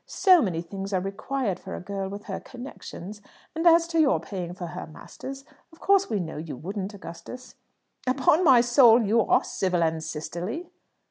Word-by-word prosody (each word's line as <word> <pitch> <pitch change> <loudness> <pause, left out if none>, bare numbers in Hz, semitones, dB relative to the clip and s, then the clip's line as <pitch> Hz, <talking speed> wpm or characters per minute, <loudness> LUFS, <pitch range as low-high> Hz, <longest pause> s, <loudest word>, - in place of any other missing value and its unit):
So 370 -4 +5
many 175 - -1
things 195 +3 -6
are 185 - +2
required 195 +2 -3
for 190 - -7
a - - -6
girl 195 +1 -4
with 200 +1 -7
her - - -5
connections; 215 -5 -9 0.3
and 325 +2 +1
as 335 0 +6
to 330 -1 +1
your 300 -4 +4
paying 180 -3 -6
for 180 - -6
her 175 +2 -7
masters, 270 - -9 0.3
of 325 - -19
course 395 0 +3
we 215 - 0
know 160 -4 -5
you 155 -3 -6
wouldn't, 195 - -5
Augustus." 200 +8 -10 0.5
"Upon 270 +6 +3
my 260 -7 +7
soul 240 -1 +6
you 220 +3 +3
are - - +3
civil 180 -3 0
and 160 -1 -1
sisterly!" 175 - -5
205 Hz, 185 wpm, -26 LUFS, 180-265 Hz, 0.5 s, my